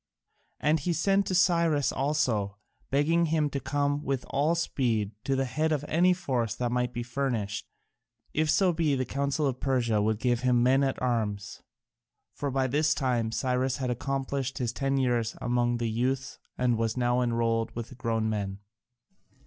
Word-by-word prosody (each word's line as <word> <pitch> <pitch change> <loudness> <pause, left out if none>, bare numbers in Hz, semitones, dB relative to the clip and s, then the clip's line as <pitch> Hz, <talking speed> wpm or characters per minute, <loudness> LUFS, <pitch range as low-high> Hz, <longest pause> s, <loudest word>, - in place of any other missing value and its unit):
And 155 +1 +2
he 170 +5 -1
sent 195 +4 +2
to 185 - 0
Cyrus 170 -5 +3
also, 125 -9 0 0.3
begging 165 +5 +2
him 155 -2 +1
to 140 - -2
come 145 +2 -1
with 135 -2 -2
all 150 +5 +2
speed 115 -10 0 0.2
at 135 - +2
the 135 - +1
head 155 +5 0
of 150 -1 0
any 175 +3 +4
force 130 - -1
that 120 -1 -2
might 125 0 0
be 120 0 -4
furnished, 120 -5 -2 0.7
if 155 0 +1
so 185 +2 +3
be 160 -4 +1
the 130 -1 -1
Council 140 +3 -1
of 130 -2 -1
Persia 120 -6 +1
would 110 +1 +1
give 120 +1 +1
him 125 -1 +3
men 135 +2 +4
at 135 -1 -1
arms. 105 -5 -2 0.7
For 145 - -3
by 135 0 +1
this 150 +4 +2
time 120 -5 0
Cyrus 130 +2 0
had 130 -2 -2
accomplished 135 +1 -2
his 125 -3 -2
ten 135 +1 0
years 120 -4 0
among 120 -1 +1
the 120 0 -1
youths 130 +4 -1 0.2
and 120 -2 +1
was 115 +1 -1
now 120 0 +2
enrolled 115 -1 +1
with 115 -1 -5
the 130 - -11
grown 115 -3 -1
men. 100 -3 -2
130 Hz, 175 wpm, -28 LUFS, 120-145 Hz, 0.7 s, any